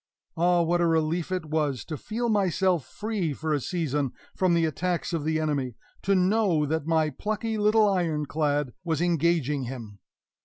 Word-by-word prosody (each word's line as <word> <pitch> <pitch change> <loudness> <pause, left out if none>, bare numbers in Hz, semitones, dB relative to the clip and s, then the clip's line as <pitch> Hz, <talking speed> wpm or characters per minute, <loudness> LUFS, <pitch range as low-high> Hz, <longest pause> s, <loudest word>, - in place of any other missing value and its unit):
Ah, 175 +1 +3
what 175 +1 +1
a 170 - +3
relief 165 +2 0
it 185 -3 -1
was 150 -4 -1
to 155 - -4
feel 225 - -3
myself 190 - +1
free 205 -8 -2
for 155 +2 -2
a 145 - +1
season 145 -4 -1 0.2
from 185 -2 +2
the 165 -1 +3
attacks 175 +3 -2
of 165 -3 -1
the 160 +1 0
enemy 140 -6 -1 0.3
to 195 0 +2
know 185 -4 +3
that 160 +1 -2
my 160 -2 +2
plucky 215 - -3
little 215 0 +4
Iron 170 -6 0
clad 145 -3 0
was 160 -3 -1
engaging 165 -5 +1
him! 115 -5 -8
165 Hz, 170 wpm, -27 LUFS, 150-185 Hz, 0.3 s, little